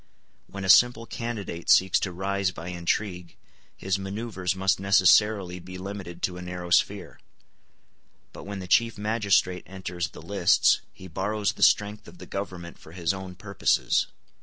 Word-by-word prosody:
When 100 -1 -7
a - - -3
simple 115 +3 +6
candidate 110 -8 -5
seeks 95 -1 +5
to 95 - -3
rise 95 +1 -1
by 90 -1 -8
intrigue, 90 +1 -3 0.4
his 95 +1 -1
manoeuvres 95 -2 -3
must 95 0 +1
necessarily 100 -1 +3
be 90 +1 -9
limited 95 -2 -8
to 90 -1 -1
a - - -7
narrow 90 -1 -7
sphere; - - +1 1.1
but - - -10
when 100 0 -5
the 95 -1 -7
chief 115 +4 +3
magistrate 105 -4 +1
enters 90 -2 -4
the - - -12
lists, - - +3
he 95 - -12
borrows 100 +4 -1
the - - -13
strength 105 +1 +3
of - - -14
the - - -10
government 90 -3 -6
for 80 - -15
his 85 0 -1
own 95 -1 -8
purposes. 100 +1 +1
95 Hz, 160 wpm, -26 LUFS, 90-100 Hz, 1.1 s, simple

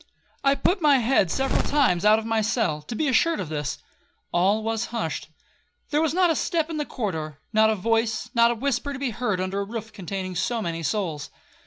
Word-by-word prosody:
I 275 0 +4
put 365 +6 +1
my 290 -3 +5
head 235 -6 +2
several 270 +9 +1
times 250 -11 +2
out 215 +1 +7
of 220 - -4
my 225 -1 +1
cell, 210 -8 0
to 190 +10 -7
be 305 - 0
assured 330 +5 +2
of 180 -5 -4
this,—all 175 +6 -2
was 225 +1 -1
hushed. 165 -11 -4 0.6
There 300 +1 +2
was 320 0 0
not 360 -2 +4
a - - +1
step 330 -1 -1
in 315 - -3
the 295 - -2
corridor,—not 200 - -1
a 220 - +2
voice, 225 +3 0
not 235 -1 +5
a 240 - 0
whisper 275 +3 -1
to - - -5
be 270 -2 -2
heard 210 -4 -1
under 185 +2 -2
a - - 0
roof 220 +1 -7
containing 190 -1 -5
so 235 +6 0
many 170 -5 -3
souls. 165 -4 -2
225 Hz, 205 wpm, -25 LUFS, 190-270 Hz, 0.6 s, out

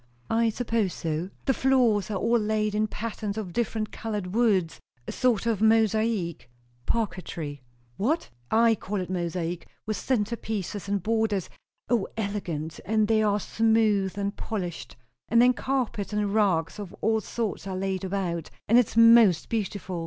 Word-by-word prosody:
"I 230 0 +3
suppose 225 -4 -1
so." 165 +2 -3 0.2
"The 270 - +3
floors 245 -7 +2
are 210 - -2
all 230 +4 +2
laid 215 0 0
in 215 +1 +1
patterns 215 -1 -4
of 195 -5 -5
different 220 -1 -1
coloured 210 -5 -4
woods 205 -8 +2 0.3
a - - -3
sort 240 -4 +1
of 225 -4 0
mosaic 220 - +2 0.2
" 120 0 -36
"Parquetry." 170 - -3 0.4
"What? 295 - 0 0.2
I 230 +1 +5
call 205 -1 -3
it 185 0 -4
mosaic, 175 -1 -3 0.2
with 215 -2 -2
centre 235 0 0
pieces 205 -3 -4
and 200 -3 0
borders, 220 -3 0 0.4
O, 230 -4 +1
elegant! 180 -7 -3
And 215 0 +1
they 220 0 +3
are 210 -1 +2
smooth 215 -3 +2
and 200 0 -2
polished; 180 -7 -5 0.3
and 230 - +4
then 250 +1 +6
carpets 250 -6 -2
and 210 -1 -1
rugs 195 -4 +1
of 200 -2 -7
all 220 0 +2
sorts 215 -2 -4
are 190 -1 -3
laid 190 0 -2
about; 180 -4 -2 0.2
and 235 +3 +6
it's 230 -2 0
most 230 -6 +6
beautiful. 200 -5 -3
210 Hz, 160 wpm, -26 LUFS, 185-225 Hz, 0.4 s, then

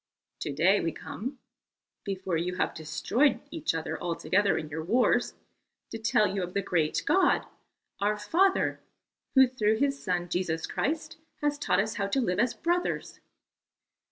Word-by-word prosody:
To - - -3
day 185 +8 +3
we 165 - -1
come 260 - -6 0.7
before 190 -3 -3
you 175 +2 -1
have 185 - 0
destroyed 160 - +1
each 315 - -1
other 160 - -4
altogether 185 +4 +1
in 155 - -4
your 160 +2 -5
wars 235 +9 +2 0.6
to 225 - -5
tell 220 -1 +3
you 195 -1 -1
of 180 +1 -5
the 200 - +2
great 165 -5 0
God, 375 -1 +3 0.5
our 210 +1 +1
Father, 360 - +2 0.6
who 265 0 +8
through 220 -4 +1
His 275 +2 0
Son 175 -2 -1
Jesus 170 -2 -1
Christ 315 +2 -2 0.3
has 295 0 +1
taught 180 -9 +2
us 215 +3 -1
how 200 -2 0
to 235 +7 0
live 205 -6 0
as 240 +2 +2
brothers." 350 +2 -1
200 Hz, 155 wpm, -28 LUFS, 175-265 Hz, 0.7 s, who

